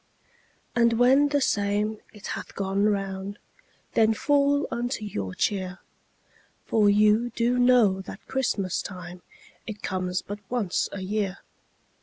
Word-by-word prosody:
And 235 -1 +4
when 260 +5 +5
the 285 -1 +1
same 210 -1 0
it 210 -2 -13
hath - - -7
gone 195 +1 0
round 195 -1 -2 0.6
Then 220 0 +4
fall 285 +2 +2
unto 240 -1 -2
your 100 - -4
cheer, 190 -2 -1 0.9
For 210 -2 +3
you 210 +3 +4
do 240 +1 +1
know 240 -6 +4
that 195 +1 -11
Christmas 215 -8 -1
time 180 -2 -8 0.5
It 215 -2 -7
comes 185 -1 -2
but 205 +1 -6
once 225 -7 0
a 195 - -6
year. 195 0 -2
210 Hz, 130 wpm, -26 LUFS, 190-240 Hz, 0.9 s, when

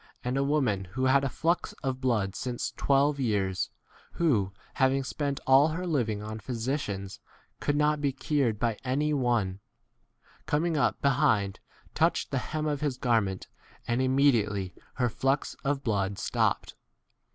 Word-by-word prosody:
And 125 +1 -1
a 135 - +2
woman 130 -10 +1
who 125 +9 -2
had 135 +1 +4
a 135 - 0
flux 170 +6 0
of 130 -1 -2
blood 110 -7 0
since 125 -2 -3
twelve 140 +1 +2
years, 100 -7 0 0.4
who, 115 - +1 0.2
having" 135 0 +2
spent 140 +1 -2
all 135 +3 +6
her 165 +3 -3
living 115 -11 0
on 110 +1 -5
physicians, 110 -4 -3 0.4
could 145 - 0
not 150 0 +2
be 145 - +2
44 135 0 -10
cured 130 -8 +2
by 115 -3 0
any 145 +4 0
one, 120 -8 0 0.9
coming 160 +2 +1
up 145 - +1
be 140 - +5
hind, 110 -8 +2 0.3
touched - - +1
the - - +1
hem 155 0 -3
of 145 -2 -1
his 145 -4 -1
garment, 110 -7 0 0.4
and 120 +2 +1
immediately 115 -8 +2 0.2
her 125 - +1
45 115 - -6
flux 135 +2 +1
of 140 0 -1
blood 100 -4 0
stopped. - - 0
130 Hz, 160 wpm, -28 LUFS, 110-145 Hz, 0.9 s, all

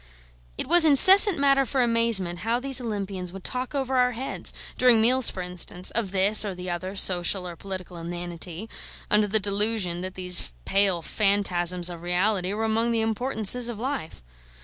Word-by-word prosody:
It - - -3
was 345 +4 +6
incessant 375 +6 +7
matter 275 -1 +2
for 260 0 -1
amazement 230 -7 0
how 230 +4 -2
these 265 0 0
Olympians 195 -5 -6
would 190 0 -11
talk 255 +3 -4
over 265 -1 -2
our 250 0 +1
heads 260 +4 -3 0.2
during 250 -3 +3
meals, 250 +3 +3
for 185 - -7
instance 180 0 -2
of 225 -4 -2
this 195 +3 +4
or 200 -3 -5
the 180 0 -7
other 185 +3 -6
social 180 0 +2
or 175 - -9
political 185 -1 -9
inanity, 175 +2 -8 0.4
under 210 0 +2
the 215 +2 0
delusion 200 -3 -1
that 185 0 -8
these 180 - +1
pale 195 -4 0
phantasms 180 -2 0
of 175 -2 -7
reality 180 +2 -1
were 220 +2 -3
among 225 +1 -1
the 230 -1 -1
importances 230 +1 0
of 235 - -7
life. 240 - -6
205 Hz, 170 wpm, -24 LUFS, 180-240 Hz, 0.4 s, incessant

